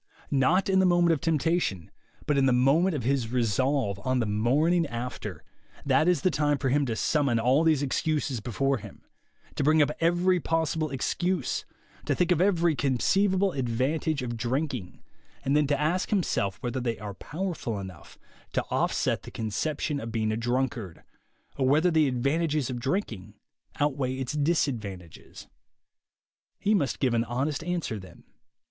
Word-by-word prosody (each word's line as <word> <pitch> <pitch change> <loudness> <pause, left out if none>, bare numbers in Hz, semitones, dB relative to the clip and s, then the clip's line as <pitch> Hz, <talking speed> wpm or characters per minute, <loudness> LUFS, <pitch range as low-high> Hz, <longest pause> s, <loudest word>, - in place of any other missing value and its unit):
Not 155 +8 +3
in 190 -1 +3
the 190 - +4
moment 175 -1 +4
of 150 - -2
temptation, 160 - 0 0.3
but 150 - +1
in 135 -1 +3
the - - +4
moment 140 +9 +3
of 135 - -3
his 125 -2 0
resolve, 125 -2 0
on 130 0 +1
"the 120 - +1
morning 145 +11 +2
after,'' 120 +1 -6 0.4
that 140 +4 +3
is 175 -5 +3
the 185 - +2
time 145 -1 +1
for 135 - -1
him 140 +1 +2
to 115 - -1
summon 140 -3 +1
all 130 +7 +3
these 155 -3 +3
excuses 140 -2 -1
before 135 +5 0
him, 105 -2 -12 0.5
to - - -2
bring 155 +2 +4
up 150 0 +4
every 175 +2 +2
possible 160 -1 -1
excuse, 175 +4 -1 0.4
to - - +1
think 180 0 +1
of 175 -1 +3
every 175 -4 +3
conceivable 190 - +2
advantage 135 +3 -1
of 120 -1 -3
drinking, 125 - -3 0.4
and 140 - +2
then 150 -1 +3
to 145 -1 +1
ask 165 +5 0
himself 105 - 0
whether 125 +1 -2
they 120 -3 -2
are 105 0 -7
powerful 160 - -4
enough 95 -4 -10 0.4
to - - +1
offset - - 0
the - - -10
conception 140 +6 -2
of 115 -2 -6
being 110 -1 0
a - - 0
drunkard, 115 -5 -2 0.5
or 130 -2 +1
whether 155 +6 +4
the 160 -2 +3
advantages 140 +2 0
of 120 - -4
drinking 125 - -3 0.4
outweigh 135 -3 0
its 130 +1 -4
disadvantages. 120 - -2 1.1
He 205 +1 +1
must 145 - +1
give 130 -3 +1
an 115 -1 +2
honest 135 +6 -2
answer 170 -11 -2
then. 95 - -14
140 Hz, 165 wpm, -27 LUFS, 120-160 Hz, 1.1 s, the